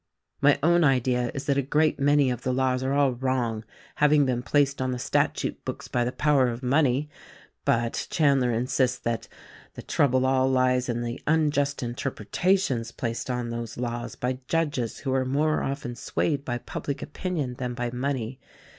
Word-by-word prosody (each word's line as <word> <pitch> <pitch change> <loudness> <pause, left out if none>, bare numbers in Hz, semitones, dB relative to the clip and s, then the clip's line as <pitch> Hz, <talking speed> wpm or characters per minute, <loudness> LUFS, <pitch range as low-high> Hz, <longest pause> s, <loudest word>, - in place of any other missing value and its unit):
My 145 0 +5
own 170 +1 +4
idea 125 -3 +2
is 135 - -4
that 140 -1 +2
a - - +3
great 150 +3 +1
many 145 -1 +3
of 125 -1 -4
the 130 - -1
laws 130 0 +1
are 130 +1 -1
all 140 -2 +3
wrong 120 -3 -1 0.2
— - - -25
having 150 -1 +5
been 125 -2 0
placed 140 +1 +1
on 130 0 0
the 125 - -2
statute - - -1
books - - -6
by 120 - 0
the 120 - -1
power 140 -2 +3
of 120 +1 -4
money; 135 +1 +2 0.6
but 115 0 0
Chandler 140 -5 +3
insists 125 +2 +1
that 115 -2 -3 0.5
the - - -8
trouble 130 -5 +2
all 130 0 +3
lies 130 -1 +2
in 120 0 -1
the 120 +1 -5
unjust 145 -3 +1
interpretations 120 - -1
placed 115 +1 -4
on 125 -1 -2
those 115 -1 -5
laws 120 -1 -4
by 125 +1 -2
judges 150 -8 -1
who 135 -2 -3
are 130 0 +2
more 145 +4 +1
often 135 -3 -3
swaved 140 +3 -1
bv 120 -1 -3
public 140 - -4
opinion 150 -6 -3
than 125 -1 -3
by 120 -1 -2
money. 125 -1 -3
130 Hz, 180 wpm, -26 LUFS, 120-145 Hz, 0.6 s, My